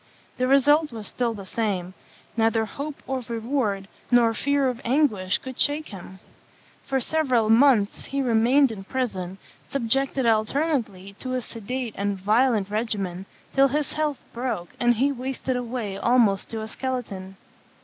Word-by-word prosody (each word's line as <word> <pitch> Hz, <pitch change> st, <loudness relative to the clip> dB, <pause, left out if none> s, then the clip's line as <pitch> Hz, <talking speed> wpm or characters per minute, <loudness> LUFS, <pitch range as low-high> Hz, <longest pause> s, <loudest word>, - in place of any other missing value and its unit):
The 255 Hz, -, +1 dB
result 290 Hz, +3 st, +4 dB
was 220 Hz, -3 st, -6 dB
still 235 Hz, 0 st, -1 dB
the 200 Hz, -2 st, -8 dB
same; 190 Hz, -4 st, -2 dB, 0.4 s
neither 225 Hz, -1 st, +2 dB
hope 285 Hz, +6 st, -7 dB
of 260 Hz, -3 st, -3 dB
reward 225 Hz, -4 st, -1 dB, 0.2 s
nor 235 Hz, -2 st, +5 dB
fear 280 Hz, +3 st, +1 dB
of 245 Hz, -2 st, -3 dB
anguish 230 Hz, -8 st, +2 dB
could 260 Hz, -1 st, -9 dB
shake 300 Hz, +2 st, +1 dB
him. 190 Hz, -2 st, -10 dB, 0.6 s
For 270 Hz, -1 st, -1 dB
several 255 Hz, -6 st, +2 dB
months 230 Hz, -4 st, +4 dB
he 275 Hz, -, -3 dB
remained 245 Hz, +3 st, +4 dB
in 200 Hz, -3 st, -7 dB
prison, 190 Hz, -6 st, -3 dB, 0.3 s
subjected 270 Hz, +1 st, 0 dB
alternately 220 Hz, -, 0 dB
to 255 Hz, -1 st, -3 dB
a 255 Hz, -, -1 dB
sedative 235 Hz, +1 st, -5 dB
and 200 Hz, 0 st, 0 dB
a -, -, -16 dB
violent 215 Hz, -1 st, +3 dB
regimen, 200 Hz, -4 st, -2 dB, 0.3 s
till 275 Hz, 0 st, +5 dB
his 290 Hz, +2 st, -1 dB
health 300 Hz, -2 st, 0 dB, 0.2 s
broke, 235 Hz, -8 st, -3 dB
and 240 Hz, 0 st, +4 dB
he 270 Hz, +5 st, +2 dB
wasted 260 Hz, 0 st, -3 dB
away 235 Hz, -5 st, -3 dB
almost 230 Hz, -5 st, +3 dB
to 225 Hz, -1 st, -4 dB
a 220 Hz, -, -5 dB
skeleton. 215 Hz, -7 st, -5 dB
235 Hz, 150 wpm, -25 LUFS, 210-265 Hz, 0.6 s, nor